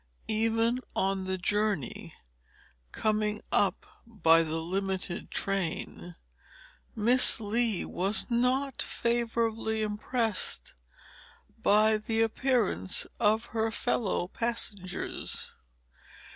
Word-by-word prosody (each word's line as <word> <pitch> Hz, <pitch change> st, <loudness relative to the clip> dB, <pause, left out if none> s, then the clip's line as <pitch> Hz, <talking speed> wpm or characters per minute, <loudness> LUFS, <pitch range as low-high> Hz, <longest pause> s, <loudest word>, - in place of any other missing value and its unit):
Even 225 Hz, +2 st, +1 dB, 0.2 s
on 195 Hz, 0 st, 0 dB
the 190 Hz, 0 st, -2 dB
journey, 205 Hz, -, -2 dB, 0.8 s
coming 215 Hz, -1 st, 0 dB
up -, -, +2 dB, 0.2 s
by 165 Hz, -8 st, +4 dB
the 160 Hz, -1 st, -2 dB
limited 190 Hz, +2 st, -3 dB
train, 180 Hz, -2 st, -4 dB, 0.8 s
Miss 240 Hz, +4 st, +6 dB
Lee 225 Hz, -1 st, 0 dB
was 195 Hz, +4 st, 0 dB
not 255 Hz, +3 st, 0 dB
favorably 230 Hz, -2 st, -1 dB
impressed 215 Hz, 0 st, -2 dB, 0.9 s
by 215 Hz, +1 st, +4 dB
the 225 Hz, +1 st, -1 dB
appearance 225 Hz, -, 0 dB
of 220 Hz, +1 st, +2 dB
her 225 Hz, 0 st, 0 dB
fellow 220 Hz, -6 st, -1 dB
passengers. 205 Hz, -4 st, -3 dB
215 Hz, 85 wpm, -29 LUFS, 195-230 Hz, 0.9 s, Miss